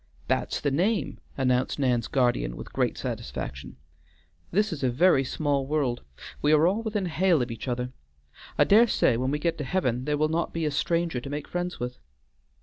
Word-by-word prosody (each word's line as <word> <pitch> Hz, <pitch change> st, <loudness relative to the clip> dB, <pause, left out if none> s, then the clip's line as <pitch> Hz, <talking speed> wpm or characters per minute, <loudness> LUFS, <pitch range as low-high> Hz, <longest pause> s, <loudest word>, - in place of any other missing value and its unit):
"That's -, -, 0 dB
the 145 Hz, -, 0 dB
name," 190 Hz, +9 st, 0 dB, 0.2 s
announced 125 Hz, -1 st, +1 dB
Nan's 125 Hz, -5 st, +1 dB
guardian 120 Hz, -, +1 dB
with -, -, -9 dB
great -, -, 0 dB
satisfaction. 65 Hz, +2 st, -5 dB, 0.7 s
"This 210 Hz, +2 st, +1 dB
is 150 Hz, -, -6 dB
a 130 Hz, -, +3 dB
very 135 Hz, +2 st, +4 dB
small 140 Hz, 0 st, -1 dB
world; 140 Hz, -5 st, 0 dB, 0.4 s
we 150 Hz, -, +3 dB
are 155 Hz, +1 st, +5 dB
all 195 Hz, +6 st, +2 dB
within 215 Hz, -3 st, -2 dB
hail 175 Hz, -1 st, +2 dB
of 120 Hz, -, -5 dB
each 115 Hz, -, -7 dB
other. 125 Hz, 0 st, -2 dB, 0.7 s
I -, -, +6 dB
dare 225 Hz, +4 st, +6 dB
say 125 Hz, -, +3 dB
when 130 Hz, +3 st, 0 dB
we 145 Hz, -, 0 dB
get 165 Hz, +1 st, -1 dB
to -, -, -2 dB
Heaven 130 Hz, -5 st, -1 dB
there 150 Hz, 0 st, 0 dB
will 155 Hz, +1 st, +2 dB
not 165 Hz, +2 st, -1 dB
be 165 Hz, -1 st, -1 dB
a 150 Hz, -, 0 dB
stranger 165 Hz, -2 st, 0 dB
to 140 Hz, -, -7 dB
make 145 Hz, 0 st, -4 dB
friends 175 Hz, 0 st, -3 dB
with." 125 Hz, +1 st, -5 dB
145 Hz, 195 wpm, -27 LUFS, 125-170 Hz, 0.7 s, I